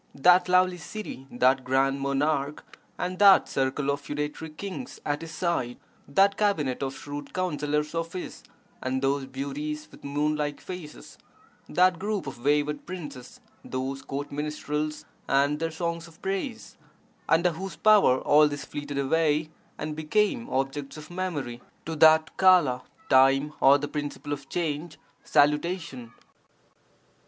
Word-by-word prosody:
That 180 +6 +5
lovely 180 0 +3
city, 160 -7 -7
that 130 +1 +2
grand 135 +2 +1
monarch, 140 +1 0 0.3
and 180 0 -3
that 200 -2 +7
circle 135 +1 0
of 140 0 -3
feudatory 150 +2 -4
kings 200 +10 -7
at 145 0 -1
his 165 - -7
side, 150 -8 -1 0.3
that 195 +7 +3
cabinet 155 -12 0
of 135 0 -3
shrewd 145 0 -8
counsellors 150 -4 -1
of 165 0 -3
his 185 - -6 0.4
and 130 +1 -2
those 135 0 0
beauties 145 +3 -5
with - - -16
moon 145 +2 0
like 145 -1 -2
faces, 180 -5 -9 0.5
that 180 -1 +3
group 205 0 -2
of 130 -3 -8
wayward 145 +1 +1
princes, 145 -8 -8 0.2
those 130 +1 -4
court 140 +1 -5
minstrels 150 +1 -3 0.2
and 140 +2 +2
their 165 0 -1
songs 170 0 -3
of 165 -1 -18
praise 220 +5 -4 0.3
— - - -35
under 170 +2 +4
whose 185 +1 -6
power 205 -11 +5
all 150 +1 +5
this 145 -1 -5
fleeted 145 -1 -6
away 155 +2 +1 0.3
and 155 0 -4
became 210 - 0
objects 135 +2 -2
of 155 +2 -11
memory, 150 -10 -4 0.2
to 160 - -4
that 160 0 +5
Kola 175 -10 +5 0.3
(time 135 +3 +4
or 140 +1 +7
the 145 +1 -4
principle 145 0 -4
of 140 -1 -8
change) 160 -1 -3 0.3
salutation! 150 -4 +1
150 Hz, 145 wpm, -27 LUFS, 140-170 Hz, 0.5 s, that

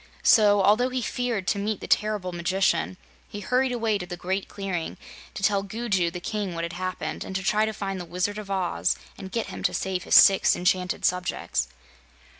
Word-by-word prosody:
So, 205 -2 +5
although 215 +6 +4
he 255 0 -2
feared 235 -6 -2
to 200 - 0
meet 210 +1 -2
the - - -7
terrible 210 -3 0
magician, 185 +2 0 0.3
he 205 - -7
hurried 250 +5 +1
away 225 -4 0
to 180 - -6
the 175 0 -6
Great 190 +3 -2
Clearing 190 -5 -4 0.4
to - - -6
tell 200 -1 +3
Gugu 200 -4 -1
the 175 +1 -6
King 200 -1 -3
what 165 - -3
had 170 0 -4
happened 185 +1 -4
and 190 - -7
to 190 - -1
try 215 +2 +2
to - - -1
find 195 -3 -4
the - - -7
Wizard 180 +5 -2
of 205 -2 -9
Oz 190 -3 0 0.2
and 190 - -9
get 230 +1 -2
him - - -7
to - - 0
save 185 -2 -2
his - - +3
six 195 -1 +7
enchanted 180 0 0
subjects. 180 - -1
195 Hz, 205 wpm, -25 LUFS, 180-210 Hz, 0.4 s, six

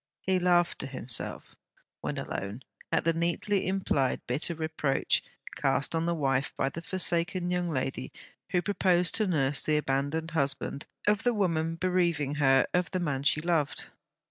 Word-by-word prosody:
He 190 -1 +1
laughed 175 -1 +3
to 135 - -2
himself, 130 -3 -5 0.4
when - - -3
alone, 100 +6 -4 0.3
at - - +2
the 165 - +3
neatly 175 +4 0
implied 185 -8 +1
bitter 150 +7 0
reproach 155 -3 0 0.3
cast 135 +2 +1
on 165 +1 0
the 170 - +1
wife 135 -3 0
by 135 - +1
the 160 +5 -7
forsaken 175 0 0
young 180 -1 0
lady, 130 - -2 0.4
who 175 -1 +1
proposed 180 -3 +2
to 215 -2 +1
nurse 145 -5 +2
the 155 -1 +2
abandoned 150 +3 -1
husband 140 -2 -1 0.2
of 210 0 +3
the 245 -1 +1
woman 165 -5 +1
bereaving 170 -5 +1
her 135 -1 +5
of 180 -2 +1
the 185 - -2
man 145 -6 -1
she 145 +2 +3
loved. 165 -4 0
165 Hz, 160 wpm, -29 LUFS, 140-180 Hz, 0.4 s, her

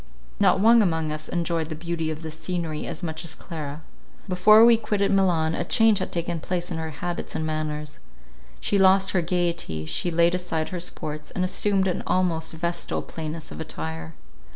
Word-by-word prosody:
Not - - +4
one 230 +3 +6
among 160 -5 0
us 155 0 -5
enjoyed 170 -2 -1
the 155 - -4
beauty 165 0 -3
of 155 +1 -5
this 160 -1 -6
scenery 170 -4 -3
so 175 - -5
much 160 -1 -4
as 170 - -4
Clara. 155 -3 -7 0.4
Before 215 +4 +7
we 235 0 +7
quitted 210 -3 0
Milan, 175 -5 +2
a - - -1
change 225 -2 +4
had 185 - -3
taken 170 -1 -2
place 175 +2 -3
in 165 - -2
her 160 0 -3
habits 175 +3 -5
and 160 - -1
manners. 150 -1 -3 0.6
She 200 - +1
lost 190 0 +5
her 180 - +2
gaiety, 170 - -1
she 80 - -1
laid 170 +1 +3
aside 175 -3 -2
her 180 - -4
sports, 155 -3 -6
and 185 - -2
assumed 195 +1 +1
an 180 - -1
almost 170 -4 +1
vestal 170 +1 -2
plainness 160 0 -6
of 75 - -7
attire. 80 0 -6
170 Hz, 185 wpm, -25 LUFS, 155-185 Hz, 0.6 s, Before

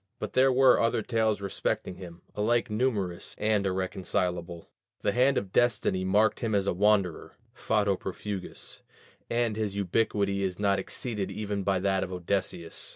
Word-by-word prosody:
But - - -5
there 130 +1 +5
were 130 0 +5
other 115 -1 +1
tales 110 -3 0
respecting 95 -2 -2
him, 85 -2 -11
alike 115 +2 +1
numerous 105 -7 -1
and 105 -2 +1
irreconcilable: 90 -2 -2 0.3
the - - +1
hand 130 +4 +3
of 95 -2 -2
destiny 105 -6 +2
marked 105 +4 +3
him 110 -3 -1
as 100 -1 +1
a 100 - +1
wanderer 100 -2 +1 0.2
(fato 105 -2 +1
profugus) 95 +1 -6 0.5
and 115 -2 0
his 105 -2 -2
ubiquity 100 0 0
is 95 -2 -2
not 100 -1 +2
exceeded 105 0 -3
even 105 -1 -3
by 95 0 +1
that 95 0 +1
of - - -5
Odysseus. 90 -2 -2
100 Hz, 155 wpm, -28 LUFS, 95-110 Hz, 0.5 s, there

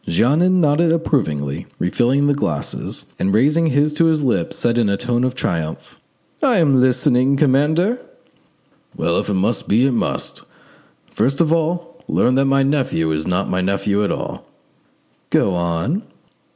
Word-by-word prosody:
Jeannin 160 - +2
nodded 160 +1 +2
approvingly, 80 - -1
refilled 125 +10 +1
the 145 - +3
glasses, 85 - -4
and 95 - 0
raising 150 +8 +3
his 150 +1 +1
to 165 +2 +2
his 160 -2 +1
lips, 120 -10 0
said 120 0 +1
in 110 -4 +2
a 100 - 0
tone 120 +2 -1
of 130 0 -1
triumph— 80 -9 -4 0.4
"I 255 -6 +3
am 140 -7 +3
listening, 130 +1 +2
commander." 155 - +2 1.0
"Well, 85 +1 0
if - - -4
it 100 - 0
must 100 +3 -1
be, 115 +6 +3
it 135 - +2
must. 120 - -3 0.7
First 135 +2 0
of 165 -1 +3
all, 170 +1 -2
learn 125 - +2
that 135 +1 +2
my 135 0 +2
nephew 135 - 0
is 80 0 -2
not 90 +2 -1
my 90 - -1
nephew 100 +2 0
at 100 - 0
all." - - -6 0.8
"Go 95 - +2
on." 85 - -1
130 Hz, 160 wpm, -19 LUFS, 100-150 Hz, 1.0 s, the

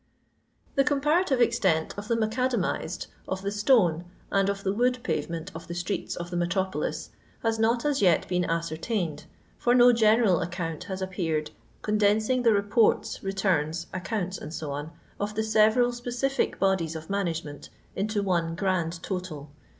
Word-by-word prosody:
The 275 - +3
comparative 290 +1 +2
extent 165 -8 +2
of 205 +1 -7
the 230 - +1
macadamized, 225 -5 -1 0.2
of 190 0 -3
the 200 - -1
stone, 205 - +3 0.3
and 195 0 +2
of 200 0 -3
the 195 - 0
wood 250 +3 +2
pavement 165 -9 -3
of - - -9
the 170 - -5
streets 175 +3 -3
of 175 0 -6
the - - -3
metropolis 185 +2 -1 0.3
has 225 -1 0
not 230 +4 +2
as 290 -2 +1
yet 180 -5 +3
been 180 0 +1
ascertained, 165 +2 -2 0.3
for 245 0 +3
no 245 0 +7
genend 220 -4 +4
account 170 -1 -4
has 190 -1 -4
appeared 165 -5 -2 0.3
condensing 215 +4 +2
the 235 -2 +4
reports, 205 +2 +2
returns, 175 -4 0
accounts, 185 0 -3 0.2
&c, 155 - -5 0.5
of 210 +1 -3
the 220 - 0
several 220 +3 +4
specific 245 +3 -1
bodies 190 -5 +1
of 160 0 -7
management 165 -7 -3 0.3
into 205 +1 -1
one 170 -3 0
grand 170 -3 -1
total. 170 -7 -5
195 Hz, 150 wpm, -27 LUFS, 175-225 Hz, 0.5 s, no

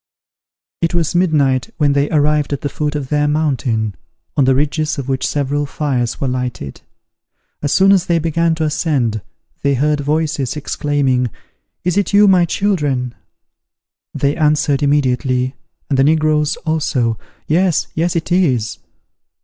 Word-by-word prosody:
It 165 +1 0
was 170 -1 0
midnight 145 -7 +2
when 145 -2 +2
they 140 +1 +1
arrived 150 -1 +1
at 140 - -3
the 145 - -2
foot 150 0 -3
of 140 -3 -4
their 150 0 +1
mountain, 130 -8 0 0.4
on 140 - +3
the 130 0 +3
ridges 150 +2 0
of 135 -2 -5
which 130 -1 -1
several 145 0 -1
fires 130 -5 -2
were 135 - -1
lighted. 125 - -4 0.8
As 145 - -1
soon 195 +1 +5
as 190 -2 +3
they 170 - +2
began 165 +1 +1
to 160 - -2
ascend, 140 - 0 0.4
they 140 -1 +2
heard 150 +3 +1
voices 150 -1 -1
exclaiming 140 -4 0 0.5
"Is 180 +1 0
it 200 0 0
you, 205 0 +6
my 185 -3 +5
children?" 150 -10 -1 1.0
They 140 +1 0
answered 150 -2 +1
immediately, 130 -2 +1 0.3
and 135 -2 0
the - - +5
negroes 155 +1 +2
also, 130 -8 0 0.3
"Yes, 175 +1 +2
yes, 170 +2 -1
it 170 +1 -2
is." 130 - +1
145 Hz, 150 wpm, -17 LUFS, 135-160 Hz, 1.0 s, you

